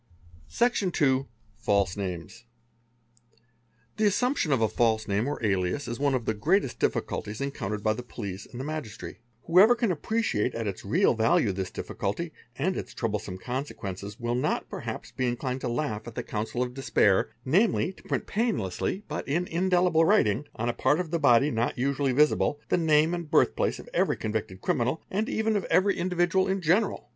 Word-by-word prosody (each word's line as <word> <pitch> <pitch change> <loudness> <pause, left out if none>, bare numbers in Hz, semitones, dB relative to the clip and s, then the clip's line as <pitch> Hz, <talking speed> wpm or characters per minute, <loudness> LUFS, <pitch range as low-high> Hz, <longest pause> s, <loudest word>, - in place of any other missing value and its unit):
Section 235 -6 +1
iii—False 110 - 0
Names. 95 +4 -6 1.5
The 215 -1 +3
assumption 230 - +1
of 135 - +3
a 110 - +3
false 110 0 +1
name 105 +5 0
or 145 - -2
alias 95 +7 0
is 120 +1 -4
one 140 -1 +2
of 120 -3 -2
the 110 - +1
greatest 125 - +1
diff - - +2
culties 105 +1 -4
encountered 105 -7 -3
by 110 - +3
the 125 - -6
police 100 -5 -7
and 120 - -9
the - - -3
magistracy; 150 -11 -6 0.2
whoever 195 +8 +6
¢a 235 -4 +1
appreciate 160 - -1
at 115 -1 -3
its 100 -3 -4
real 150 - +3
value 110 -1 +2
this 95 -1 -3
difficulty 155 +12 -4 0.2
and 180 +8 0
its - - -6
troublesome 105 -5 -3
consequence 105 -5 -5
will 120 0 -1
not 125 - -1
perhaps - - -6
be 130 - -1
inclined 125 +2 -2
to 125 - -2
laugh 120 -4 -2
at 115 - -8
the - - -3
counsel 110 +3 -2
of 125 0 -5
despair, 115 -7 +2 0.2
namel 190 - +2
to - - -17
print - - -2
painlessly 200 - -1
but - - -5
in 170 +6 0
indelible 175 -1 +2
writing, 150 - +3
on 120 - -2
a 120 - +1
part 145 +7 +2
of 175 -3 -3
the 170 - 0
body 135 -1 +5
n 115 +2 +1
usually 135 +1 0
visible, 145 +1 +2
the - - +3
name 160 0 +3
and 170 -3 -4
birth 150 - +3
place - - 0
of - - -11
every - - +1
convicted 105 -4 -4
criminal, 125 +6 0
ai 210 +3 0
even 220 0 0
of 205 - 0
every 195 +2 +3
individual 180 +1 +1
in 190 +1 0
general. 185 - +1
130 Hz, 185 wpm, -27 LUFS, 110-175 Hz, 1.5 s, whoever